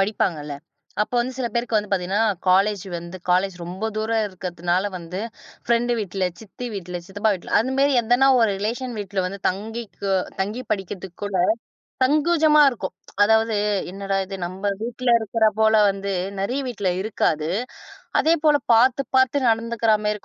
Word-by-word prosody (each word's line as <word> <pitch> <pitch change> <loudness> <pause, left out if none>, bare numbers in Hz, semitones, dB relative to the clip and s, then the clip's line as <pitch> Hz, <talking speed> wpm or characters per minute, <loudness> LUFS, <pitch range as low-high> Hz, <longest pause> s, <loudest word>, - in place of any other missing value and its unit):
படிப்பாங்க 195 -4 0
இல்ல? 145 -1 -5 0.5
அப்ப 210 - -6
வந்து 250 +2 -1
சில 260 -2 -1
பேருக்கு 235 -1 0
வந்து 210 -1 -1
பாத்தீங்கன்னா 190 +2 0 0.3
காலேஜ் 195 +1 +3
வந்து 170 +2 -8
காலேஜ் 185 +1 +2
ரொம்ப 185 +6 -4
தூரம் 220 +1 0
இருக்கறதுனால 180 -1 -2
வந்து 175 +1 -7 0.5
ஃபிரெண்ட் 235 +1 +1
வீட்ல, 195 -2 -2 0.2
சித்தி 220 +3 -8
வீட்ல, 180 -2 -5
சித்தப்பா 205 +3 0
வீட்ல, 180 - -9
அந்த 260 +4 0
மாதிரி 280 +1 +4
எதனா 245 +4 +3
ஒரு 225 - +4
ரிலேஷன் 240 +4 -3
வீட்ல 200 -2 -2
வந்து 195 +2 -6
தங்கிக் 220 +3 -5 0.4
தங்கிப் 215 +6 -3
படிக்கிறதுக்குக் 190 -2 -4
கூட 200 -3 -1 0.6
சங்குஜமா 305 +2 +4
இருக்கும். 200 -8 -5 0.3
அதாவது, 220 +1 +3 0.4
என்னடா 195 0 -2
இது 195 - -5
நம்ம 190 +3 -2
வீட்ல 245 +2 -2
இருக்கறா 220 0 +2
போல 220 0 +4 0.2
வந்து 195 0 -3 0.3
நிறைய 245 +8 -1
வீட்ல 200 -6 -1
இருக்காது. 160 -6 0 0.7
அதே 320 - +4
போல 300 - +6 0.2
பார்த்துப் 255 +3 +3
பார்த்து 260 +1 +3
நடந்துக்கிறாமே 225 -2 +1
210 Hz, 150 wpm, -23 LUFS, 190-235 Hz, 0.7 s, போல